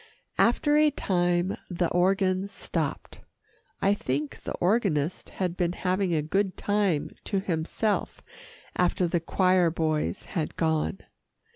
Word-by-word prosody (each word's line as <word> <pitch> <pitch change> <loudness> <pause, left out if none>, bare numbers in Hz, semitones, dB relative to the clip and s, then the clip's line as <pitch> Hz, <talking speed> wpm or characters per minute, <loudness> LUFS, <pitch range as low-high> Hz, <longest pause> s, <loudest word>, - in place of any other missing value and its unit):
After 295 +5 +4
a 305 0 +6
time, 175 -7 0
the 175 -1 0
organ 185 +1 +2
stopped. 200 - -4 0.6
I 200 - +5
think 145 -6 -3
the - - -5
organist 180 -6 0
had 180 -2 -2
been 175 -2 0
having 185 0 0
a 155 -3 +1
good 190 +4 0
time 200 -7 0
to 200 - 0
himself 190 +4 -1 0.5
after 180 0 +2
the 170 +1 +1
choir 180 +1 +3
boys 160 +1 -1
had 165 -6 -2
gone. 160 +3 0
180 Hz, 125 wpm, -27 LUFS, 165-195 Hz, 0.6 s, a